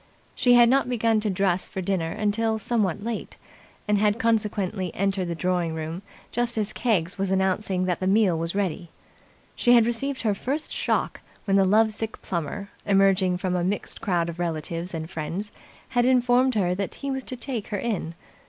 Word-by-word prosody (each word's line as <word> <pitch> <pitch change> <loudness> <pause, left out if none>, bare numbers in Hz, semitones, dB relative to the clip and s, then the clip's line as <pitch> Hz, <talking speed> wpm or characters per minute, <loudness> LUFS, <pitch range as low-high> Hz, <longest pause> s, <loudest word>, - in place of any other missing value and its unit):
She 245 -1 +4
had 240 -1 +7
not 265 +1 +3
begun 230 -2 +2
to 210 0 -1
dress 190 -1 0
for - - -5
dinner 175 -3 -1
till 225 +1 0
somewhat 210 -4 -1
late, 230 -1 -5 0.5
and 210 -1 +3
had 210 +1 +2
consequently 210 -5 0
entered 195 -1 0
the 170 -1 -3
drawing 175 -1 -1
room 160 +3 -5 0.3
just 240 0 0
as 215 -1 0
Keggs 195 -6 0
was 195 -1 0
announcing 190 0 +1
that 180 -1 -1
the 185 - -1
meal 195 -3 +4
was 165 +2 -3
ready. 180 -4 -2 0.7
She 240 - +4
had 235 -2 +6
received 260 +3 -2
her 215 -2 +2
first 275 +9 -3
shock - - -1 0.2
when 195 -2 +2
the 195 -1 +5
love 220 +3 +4
sick 220 +1 -5
Plummer, 195 +3 -4
emerging 195 -2 +3
from 180 0 -1
a 175 - 0
mixed 195 +3 -3
crowd 175 -6 0
of 170 0 -6
relatives 170 +1 -3
and 160 -1 -4
friends, 170 +6 -4 0.4
had 245 - +2
informed 250 0 +3
her 180 -4 +2
that 195 +1 -3
he 280 -1 -4
was 265 -1 -3
to 255 - -6
take 245 -3 -4
her 205 - -3
in. 190 -7 -3
200 Hz, 190 wpm, -25 LUFS, 180-225 Hz, 0.7 s, had